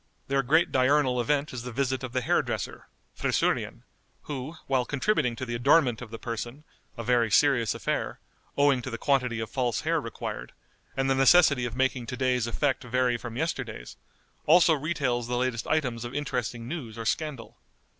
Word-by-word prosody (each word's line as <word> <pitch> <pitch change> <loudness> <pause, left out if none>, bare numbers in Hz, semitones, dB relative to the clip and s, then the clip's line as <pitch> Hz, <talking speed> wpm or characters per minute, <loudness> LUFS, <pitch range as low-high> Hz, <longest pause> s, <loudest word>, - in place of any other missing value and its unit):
Their 135 0 +2
great 160 +7 +3
diurnal 130 -1 +3
event 145 +4 0
is 125 - -4
the 125 +1 -6
visit 130 +1 -1
of 130 - -5
the 130 - -1
hair - - +2
dresser - - -5 0.3
(friseurian), - - 0 0.4
who, 145 +2 -6
while 130 -2 +1
contributing 145 - 0
to 130 - -5
the 120 - -5
adornment 125 0 +3
of 125 - -8
the 115 - -7
person, 120 +5 -6 0.3
a 115 - -4
very 120 -1 +2
serious 120 -4 +3
affair, - - -2 0.4
owing 140 -3 +4
to 130 - -5
the 115 - -4
quantity 125 -4 +1
of 110 - -5
false 125 -4 0
hair 165 0 0
required, 115 - -6 0.4
and 135 0 +1
the 135 - +3
necessity 135 -1 +5
of 120 -1 -4
making 130 -2 0
to 125 - -5
day's 125 -2 +1
effect 135 +3 0
vary 125 0 +1
from 120 0 -6
yesterday's, 160 - -4 0.5
also 165 +1 +6
retails 140 -6 -1
the 120 0 -1
latest 125 -2 -1
items 125 -7 0
of 120 +2 -7
interesting 125 -5 -3
news 125 -7 -6
or 115 - -5
scandal. 140 -1 -3
130 Hz, 180 wpm, -27 LUFS, 120-140 Hz, 0.5 s, also